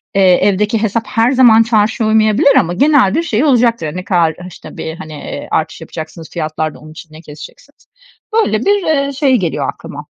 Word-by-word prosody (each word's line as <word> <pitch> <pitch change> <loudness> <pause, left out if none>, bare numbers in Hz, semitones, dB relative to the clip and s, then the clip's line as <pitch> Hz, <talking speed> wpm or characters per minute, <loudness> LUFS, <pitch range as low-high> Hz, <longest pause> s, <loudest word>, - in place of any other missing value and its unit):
eee, 195 - +3
evdeki 210 +4 +1
hesap 220 +1 -1
her 235 0 +1
zaman 240 -4 +5
çarşıya 220 0 0
uymayabilir 220 +6 +3
ama 175 -7 -1
genel 275 -2 +3
bir 330 - 0
şey 235 -6 -1
olacaktır. 235 - +1
Ne 185 - -5
kadar, 170 -5 +1
işte, 180 - -13
bir, 160 - -6
hani, 155 -4 -10
eee, 150 - -8
artış 160 +1 -2
yapacaksınız 160 0 -9
fiyatlarda, 155 -1 -4
onun 155 +1 -14
için 155 0 -13
ne 155 - -12
keseceksiniz? 155 - -14 0.5
Böyle, 435 - +1
bir, 405 -1 +2
eee, 280 -3 0
şey 270 -1 +1
geliyor 175 -7 -2
aklıma. - - -10
215 Hz, 180 wpm, -14 LUFS, 165-255 Hz, 0.5 s, zaman